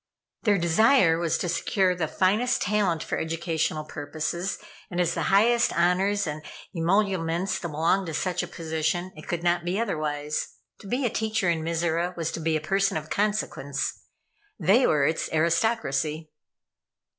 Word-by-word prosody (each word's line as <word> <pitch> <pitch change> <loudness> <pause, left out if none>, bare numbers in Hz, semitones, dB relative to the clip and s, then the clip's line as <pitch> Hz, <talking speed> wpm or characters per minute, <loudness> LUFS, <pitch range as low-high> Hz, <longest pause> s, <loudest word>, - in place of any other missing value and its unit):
Their 210 -4 +3
desire 170 0 +4
was 170 -1 +1
to 180 - -2
secure 180 +2 +1
the 175 -3 -2
finest 210 +10 +1
talent 185 -5 +1
for - - -3
educational 160 -1 -1
purposes, 155 +5 -4 0.3
and 175 - -4
as 170 -1 +2
the - - -2
highest 230 +4 +4
honors 190 +4 +2
and 155 -1 -4 0.3
emoluments 185 0 +1
belonged 170 +3 0
to 160 - -4
such 180 +2 -1
a 175 - -5
position, 165 +1 -2
it 155 - -12
could 170 -1 -3
not 175 0 +2
be 180 +4 -1
otherwise. 155 -8 -2 0.2
To - - -12
be 250 +6 -1
a - - +2
teacher 220 -5 0
in 165 -1 -1
Mizora 170 +2 -1
was 165 -1 -2
to - - -5
be 160 0 +1
a - - -6
person 195 +3 +1
of 155 0 -7
consequence. 200 -10 -1 0.6
They 235 +7 +4
were 145 -2 +3
its 160 +2 -1
aristocracy. 160 -3 0
170 Hz, 155 wpm, -26 LUFS, 160-195 Hz, 0.6 s, desire